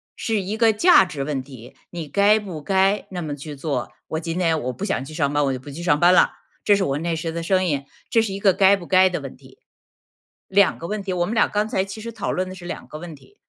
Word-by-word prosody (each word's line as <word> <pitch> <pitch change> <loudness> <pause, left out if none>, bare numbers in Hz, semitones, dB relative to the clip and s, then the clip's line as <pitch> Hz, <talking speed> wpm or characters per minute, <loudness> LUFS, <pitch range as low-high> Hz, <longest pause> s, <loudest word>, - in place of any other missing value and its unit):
是 220 -3 -1
一 200 +4 -4
个 225 -1 +4
价 280 - +6
值 145 -6 -5
问 135 -2 -3
题， 130 -3 -13 0.2
你 170 -3 -6
该 205 +6 +4
不 185 -7 -7
该 195 +3 +2
那 180 -2 -4
么 150 -3 -4
去 145 +1 -8
做， 135 -3 -3 0.2
我 160 - -3
今 165 +2 -4
天 165 -3 +2
我 125 +1 -2
不 185 - -8
想 135 - -2
去 155 - -10
上 145 -3 0
班， 145 0 +2
我 135 - 0
就 130 - -4
不 130 - -12
去 155 +5 -7
上 150 -4 +2
班 175 +2 +6
啦， - - +4 0.3
这 205 - +5
是 200 - 0
我 140 -6 -1
那 170 +1 -2
时 160 +1 -3
的 170 +1 -4
声 185 +2 +2
音， 140 -5 -1 0.2
这 230 - +3
是 205 -3 -3
一 195 - -5
个 195 -2 +4
该 195 0 +5
不 175 -4 -9
该 185 0 +5
的 180 - -3
问 135 -2 -8
题。 - - -19 0.9
2 200 0 +3
个 170 - -6
问 210 0 -4
题， 190 -1 -3
我 175 -1 0
们 220 - -3
俩 225 - +4
刚 210 +1 -1
才 205 -4 0
其 195 +3 -8
实 230 +1 -6
讨 220 -2 -3
论 185 +1 -2
的 185 - -8
是 175 -2 -11
2 175 - -7
个 155 - -8
问 170 -1 -8
题。 150 - -21
175 Hz, 295 characters per minute, -22 LUFS, 150-200 Hz, 0.9 s, 价